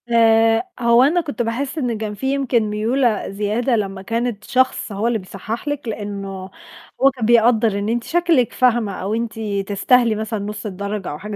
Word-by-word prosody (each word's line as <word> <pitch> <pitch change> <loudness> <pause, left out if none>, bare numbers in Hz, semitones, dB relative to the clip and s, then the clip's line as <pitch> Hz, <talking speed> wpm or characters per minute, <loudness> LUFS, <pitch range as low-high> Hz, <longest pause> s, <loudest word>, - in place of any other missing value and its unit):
آآ، 225 -1 +4 0.2
هو 235 +1 +5
أنا 330 +6 +3
كنت 285 -6 -4
باحِس 255 +6 -3
إن 245 -6 -1
كان 215 -1 -4
في 265 +6 -2
يمكن 260 -4 +1
ميولة 225 +2 0
زيادة 210 +5 0
لمّا 195 -3 -3
كانت 230 0 -2
شخص 260 -3 0
هو 205 +3 -1
اللي 235 -2 0
بيصحّح 205 +7 -7
لِك، 290 -3 -3
لإنّه 195 -3 -5 0.5
هو 275 +1 +6
كان 240 -4 -2
بيقدّر 225 -2 +3
إن 205 +1 -2
أنتِ 235 +1 -1
شكلِك 335 -8 +1
فاهمة 240 -5 +2
أو 195 +3 -2
أنتِ 230 0 -3 0.3
تستاهلي 230 +3 +3
مثلًا 220 0 -3
نُص 210 +2 -6
الدرجة 200 0 -4
أو 150 - -7
حاجة 210 +1 -6
225 Hz, 180 wpm, -20 LUFS, 210-245 Hz, 0.5 s, هو